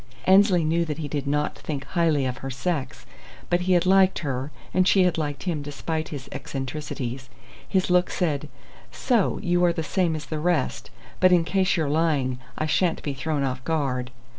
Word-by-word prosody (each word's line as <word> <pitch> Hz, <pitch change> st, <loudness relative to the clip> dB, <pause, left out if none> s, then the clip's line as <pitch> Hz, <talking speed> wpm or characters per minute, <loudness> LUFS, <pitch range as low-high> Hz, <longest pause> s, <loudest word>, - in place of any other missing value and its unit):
Annesley 190 Hz, -2 st, +5 dB
knew 165 Hz, +2 st, +1 dB
that 150 Hz, -2 st, -4 dB
he 155 Hz, -2 st, -4 dB
did 145 Hz, -1 st, -3 dB
not 150 Hz, +1 st, 0 dB
think 140 Hz, -3 st, -5 dB
highly 160 Hz, -6 st, +1 dB
of 130 Hz, 0 st, -2 dB
her 135 Hz, -, -6 dB
sex, 135 Hz, -1 st, -3 dB, 0.5 s
but 175 Hz, 0 st, +3 dB
he 185 Hz, +1 st, +2 dB
had 175 Hz, 0 st, +3 dB
liked 190 Hz, 0 st, +5 dB
her 135 Hz, 0 st, -2 dB, 0.2 s
and 185 Hz, 0 st, +3 dB
she 195 Hz, -2 st, +5 dB
had 180 Hz, -2 st, +2 dB
liked 145 Hz, -2 st, -3 dB
him 170 Hz, -5 st, -2 dB
despite 155 Hz, +2 st, -4 dB
his 140 Hz, -3 st, -7 dB
eccentricities. 130 Hz, -2 st, -5 dB, 0.4 s
His 190 Hz, -2 st, +1 dB
look 180 Hz, 0 st, +4 dB
said: 150 Hz, -4 st, -1 dB, 0.4 s
"So 235 Hz, -7 st, +1 dB
you 175 Hz, -1 st, +2 dB
are 175 Hz, -1 st, +4 dB
the 160 Hz, -, -3 dB
same 170 Hz, 0 st, 0 dB
as 150 Hz, -1 st, -6 dB
the 155 Hz, +2 st, -4 dB
rest! 165 Hz, -4 st, 0 dB, 0.3 s
But 185 Hz, 0 st, +5 dB
in 175 Hz, -2 st, +5 dB
case 190 Hz, +2 st, +1 dB
you're 160 Hz, -3 st, 0 dB
lying, 145 Hz, -5 st, +1 dB, 0.2 s
I 155 Hz, -, -1 dB
sha'n't 165 Hz, +2 st, +1 dB
be 145 Hz, -, -2 dB
thrown 145 Hz, +2 st, -2 dB
off 130 Hz, -1 st, -2 dB
guard." 135 Hz, -6 st, -1 dB
155 Hz, 190 wpm, -25 LUFS, 140-180 Hz, 0.5 s, Annesley